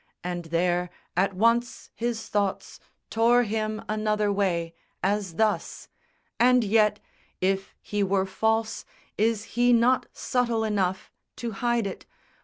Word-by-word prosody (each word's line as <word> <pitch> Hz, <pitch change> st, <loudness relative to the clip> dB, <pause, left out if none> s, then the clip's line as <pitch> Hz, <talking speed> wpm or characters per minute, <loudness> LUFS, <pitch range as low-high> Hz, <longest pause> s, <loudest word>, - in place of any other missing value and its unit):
And 175 Hz, -1 st, -4 dB
there, 175 Hz, +2 st, 0 dB, 0.3 s
at 190 Hz, +2 st, +1 dB
once, 230 Hz, +4 st, +1 dB
his 230 Hz, -1 st, -3 dB
thoughts 200 Hz, -2 st, -2 dB, 0.3 s
Tore 235 Hz, +2 st, +4 dB
him 215 Hz, 0 st, -2 dB
another 215 Hz, -1 st, 0 dB
way, 170 Hz, -4 st, 0 dB, 0.3 s
as 195 Hz, -3 st, 0 dB
thus, 215 Hz, +1 st, -1 dB, 0.5 s
"And 250 Hz, 0 st, +5 dB
yet 210 Hz, 0 st, +3 dB, 0.4 s
If 195 Hz, +1 st, -1 dB
he 205 Hz, 0 st, -2 dB
were 195 Hz, -1 st, +2 dB
false, 220 Hz, +3 st, 0 dB, 0.3 s
is 220 Hz, 0 st, +1 dB
he 245 Hz, +1 st, +4 dB
not 240 Hz, +2 st, +3 dB
subtle 235 Hz, -3 st, 0 dB
enough 195 Hz, -4 st, -1 dB, 0.2 s
To 235 Hz, -1 st, -4 dB
hide 235 Hz, +2 st, 0 dB
it? 195 Hz, -, -6 dB
210 Hz, 125 wpm, -26 LUFS, 195-230 Hz, 0.5 s, And